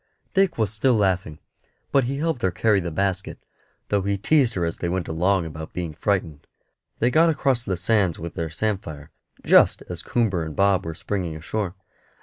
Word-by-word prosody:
Dick 195 Hz, -2 st, +2 dB
was 110 Hz, -3 st, 0 dB
still 120 Hz, +4 st, +2 dB
laughing, 95 Hz, -6 st, 0 dB, 0.5 s
but 135 Hz, -3 st, +3 dB
he 135 Hz, +3 st, -2 dB
helped 160 Hz, -4 st, -1 dB
her 95 Hz, -, +2 dB
carry 100 Hz, +3 st, +2 dB
the 85 Hz, -2 st, -3 dB
basket, 95 Hz, +2 st, -2 dB, 0.5 s
though 100 Hz, -1 st, +2 dB
he 100 Hz, +1 st, -1 dB
teased 130 Hz, +2 st, +2 dB
her 90 Hz, -2 st, 0 dB
as 85 Hz, -, -4 dB
they 85 Hz, -, -2 dB
went 90 Hz, 0 st, -2 dB
along 90 Hz, +3 st, +1 dB
about 80 Hz, 0 st, -8 dB
being 85 Hz, -3 st, -4 dB
frightened. 85 Hz, -4 st, -2 dB, 0.5 s
They 120 Hz, +2 st, +2 dB
got 165 Hz, +5 st, +5 dB
across 135 Hz, -6 st, +1 dB
the 95 Hz, -5 st, -2 dB
sands 95 Hz, -2 st, +1 dB
with 85 Hz, 0 st, -6 dB
their 80 Hz, -1 st, -3 dB
samphire, 80 Hz, -5 st, -4 dB, 0.3 s
just -, -, +5 dB
as -, -, -4 dB
Coomber 100 Hz, -8 st, 0 dB
and 80 Hz, -2 st, -6 dB
Bob 100 Hz, -3 st, +2 dB
were 80 Hz, -, -4 dB
springing 90 Hz, -3 st, -3 dB
ashore. 95 Hz, +4 st, -3 dB
95 Hz, 185 wpm, -24 LUFS, 85-115 Hz, 0.5 s, got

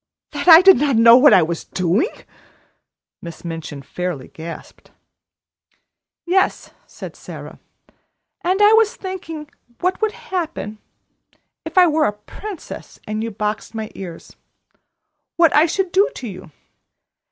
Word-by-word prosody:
"That -, -, -5 dB
I 330 Hz, -1 st, +10 dB
did 385 Hz, 0 st, +8 dB
not 280 Hz, -1 st, +1 dB
know 230 Hz, +1 st, +8 dB
what 280 Hz, +4 st, +7 dB
I 180 Hz, -, +6 dB
was 165 Hz, +1 st, -4 dB
doing!" 185 Hz, -, 0 dB, 1.1 s
Miss 170 Hz, 0 st, -10 dB
Minchin 165 Hz, -4 st, -7 dB
fairly 175 Hz, -3 st, -5 dB
gasped. 165 Hz, +1 st, -10 dB, 1.4 s
"Yes," 380 Hz, +2 st, 0 dB, 0.2 s
said -, -, -10 dB
Sara, -, -, -10 dB, 0.8 s
"and 375 Hz, +4 st, +2 dB
I 420 Hz, +1 st, +7 dB
was 445 Hz, -1 st, +3 dB
thinking 335 Hz, -5 st, -7 dB, 0.3 s
what 365 Hz, +3 st, -1 dB
would 435 Hz, -1 st, 0 dB
happen, 325 Hz, -, -5 dB, 0.9 s
if -, -, -8 dB
I 365 Hz, -, +8 dB
were 310 Hz, -2 st, +2 dB
a 205 Hz, -, 0 dB
princess 340 Hz, -, -10 dB
and 215 Hz, +1 st, -3 dB
you 230 Hz, -, -3 dB
boxed 215 Hz, +1 st, -4 dB
my 220 Hz, -1 st, -5 dB
ears 175 Hz, -4 st, -10 dB, 1.0 s
what 335 Hz, -3 st, +4 dB
I 310 Hz, +3 st, +5 dB
should 375 Hz, +2 st, -2 dB
do 400 Hz, +5 st, +3 dB
to 250 Hz, -, -7 dB
you. 185 Hz, -5 st, -10 dB
275 Hz, 135 wpm, -20 LUFS, -, 1.4 s, I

